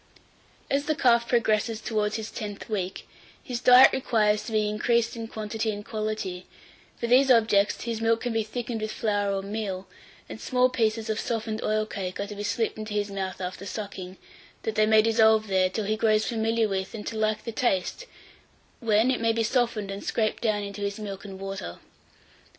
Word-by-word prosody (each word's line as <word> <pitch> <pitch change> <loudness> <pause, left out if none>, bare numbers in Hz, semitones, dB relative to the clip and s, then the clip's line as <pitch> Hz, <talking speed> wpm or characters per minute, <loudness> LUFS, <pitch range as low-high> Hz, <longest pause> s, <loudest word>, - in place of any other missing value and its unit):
852. - - +4
AS 285 - -8
THE 310 - +1
CALF 235 -2 +4
PROGRESSES 225 -1 +1
TOWARDS 215 -2 -1
HIS 220 0 -5
TENTH 205 -1 -6
WEEK, 190 -3 -3 0.4
his 245 -2 -4
diet 250 +1 +8
requires 215 -5 +2
to - - -6
be 215 -1 +2
increased 230 +2 +1
in 230 -1 -5
quantity 220 0 -3
and 205 -1 -4
quality; 215 -4 -4 0.5
for - - -2
these 255 +3 +5
objects, 220 -4 +3
his 230 -1 -3
milk 225 0 +2
can 245 -2 -2
be 225 - +1
thickened 230 +1 -4
with 215 0 -2
flour 205 -2 0
or 195 0 -2
meal, 200 -2 -4 0.4
and - - -9
small 255 -1 +2
pieces 225 -2 0
of 220 0 -1
softened 220 -1 -2
oil 215 0 0
cake 190 -4 -5
are 200 - -1
to 205 - -8
be 205 - -6
slipped 220 +1 -1
into 215 -1 -5
his 205 -1 -1
mouth 190 -1 -4
after 185 +1 -5
sucking, 195 -4 -6 0.5
that 220 - -2
they 215 0 +3
may 220 0 +6
dissolve 220 -1 +4
there, 190 -2 +2
till 210 +3 -3
he 215 +2 0
grows 215 -1 +2
familiar 225 -1 +1
with, 190 +1 -3
and 210 - -7
to 225 - -4
like 215 0 0
the 230 - -4
taste, 240 - -1 0.7
when 225 +2 +3
it 255 - -1
may 230 0 +3
be 225 0 0
softened 230 -4 0
and 195 +1 -6
scraped 215 -2 -1
down 215 -3 +1
into 200 0 -7
his 200 0 -2
milk 200 -1 -6
and 190 -1 -8
water. 195 - -6
215 Hz, 200 wpm, -26 LUFS, 205-230 Hz, 0.7 s, diet